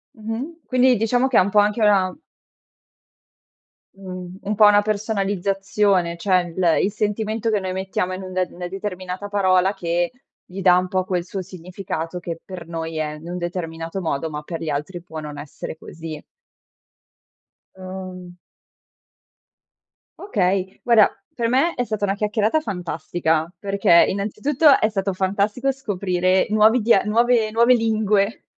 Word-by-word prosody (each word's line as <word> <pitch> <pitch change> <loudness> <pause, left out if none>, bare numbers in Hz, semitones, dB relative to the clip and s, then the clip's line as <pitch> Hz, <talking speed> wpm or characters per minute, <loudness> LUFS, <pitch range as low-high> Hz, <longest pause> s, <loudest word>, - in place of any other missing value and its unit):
Mh-mh. 230 +9 -5
Quindi 255 -1 +3
diciamo 245 +4 +2
che 260 - +2
è - - +8
un 185 +2 +2
po' 210 +1 +4
anche 210 +2 +2
una 195 -3 +3 1.8
uhm, 185 -1 -8
un 210 +1 -2
po' 210 - +6
una 205 0 +6
personalizzazione, 200 -3 0
cioè 175 -1 +1
il 175 -4 +3
il 200 - +1
sentimento 215 +2 -1
che 210 -2 +1
noi 185 -1 -4
mettiamo 190 -1 -2
in 185 - -5
un 185 - -8 0.2
una 175 0 -7
determinata 190 0 -5
parola 190 -1 +2
che 175 0 -1 0.3
gli 190 +2 -7
dà 180 -1 +6
un 185 0 0
po' 185 0 0
quel 180 -2 -2
suo 190 +1 -5
significato 180 -1 -6
che 170 -2 -6
per 180 -3 -9
noi 165 -1 -5
è 150 -1 -2
in 155 +2 -11
un 180 - -4
determinato 170 0 -4
modo 160 -2 -2
ma 150 0 -5
per 165 +1 -6
gli 160 - -3
altri 150 +5 -4
può 160 -2 -8
non 150 -1 -7
essere 145 +2 -8
così. 160 -2 -8 1.6
Uhm 185 -1 -8 1.8
Okay, 190 - -1
guarda 230 -3 +5 0.2
per 235 -1 -1
me 275 +8 +2
è 245 - -1
stata 215 -2 -4
una 195 - 0
chiacchierata 215 +7 +1
fantastica, 170 - -2
perché 195 -4 +4
innanzitutto 255 +9 +3
è 215 - +2
stato 195 -2 -2
fantastico, 200 +8 0
scoprire 185 -7 0
nuovi 215 +3 +4
dia 210 -3 +4
nuove 230 +1 +2
nuove 235 +3 +5
lingue, 215 -2 +1
190 Hz, 150 wpm, -22 LUFS, 180-215 Hz, 1.8 s, è